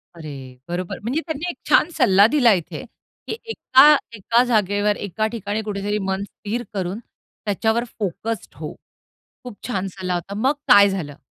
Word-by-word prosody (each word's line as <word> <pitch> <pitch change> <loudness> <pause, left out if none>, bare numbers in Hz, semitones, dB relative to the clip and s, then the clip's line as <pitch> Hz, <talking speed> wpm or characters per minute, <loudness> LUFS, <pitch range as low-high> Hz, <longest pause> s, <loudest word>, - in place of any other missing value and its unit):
अरे, 140 -6 -9
बरोबर. 175 +1 -4
म्हणजे 250 +9 -2
त्यांनी 315 +2 -3
एक - - -6
छान 310 - +5
सल्ला 200 - +6
दिला 245 -4 +4
इथे, 175 -4 -4 0.4
की - - -3 0.2
एका 290 -5 +6 0.2
एका 230 +4 +2
जागेवर 210 -3 +1
एका 210 +2 -2
ठिकाणी 215 -1 -3
कुठेतरी 205 0 -2
मन 190 +1 -1
स्थिर 215 +3 -5
करून, 190 +2 -3 0.5
त्याच्यावर 220 +3 +1 0.2
फोक्स्ड 205 -3 -4
हो. 155 -1 -6 0.7
खूप 245 -5 -9
छान 195 -5 -2
सल्ला 185 -1 -4
होता. 175 +3 -4
मग 270 - +4
काय 200 0 +8
झालं? 155 -7 -5
205 Hz, 155 wpm, -22 LUFS, 185-235 Hz, 0.7 s, काय